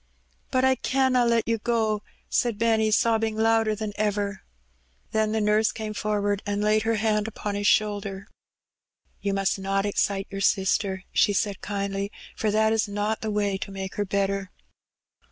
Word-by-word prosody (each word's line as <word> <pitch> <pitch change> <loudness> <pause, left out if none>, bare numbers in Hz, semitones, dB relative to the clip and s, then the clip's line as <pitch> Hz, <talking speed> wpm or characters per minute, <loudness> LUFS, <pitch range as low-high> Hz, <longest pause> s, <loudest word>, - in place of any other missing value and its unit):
"But 255 0 +2
I 265 - +5
canna 255 -1 +2
let 230 -1 +2
you 230 -1 +1
go," 220 -2 0 0.3
said 235 -4 0
Benny, 220 -1 +2
sobbing 225 0 +2
louder 225 -1 +3
than 210 -1 -4
ever. 205 -1 -1 0.7
Then 220 -1 +1
the 220 - 0
nurse 210 +1 +3
came 215 -1 -5
forward, 205 -1 -1
and 205 0 -2
laid 215 +1 +3
her 225 +1 +1
hand 215 0 +1
upon 210 -1 -4
his 205 0 0
shoulder. 205 -2 +1 0.9
"You 200 -1 -1
must 195 0 0
not 195 +1 0
excite 200 -1 0
your^ 195 0 -3
sister," 190 -1 +1
she 205 - +3
said 200 0 -1
kindly, 200 0 -3 0.2
'^for 215 - 0
that 220 +1 +3
is 220 -1 +1
not 205 +2 -2
the 220 - -2
way 205 -2 0
to - - -5
make 195 0 -6
her 205 - -1
better." 195 0 -1
210 Hz, 170 wpm, -25 LUFS, 200-220 Hz, 0.9 s, I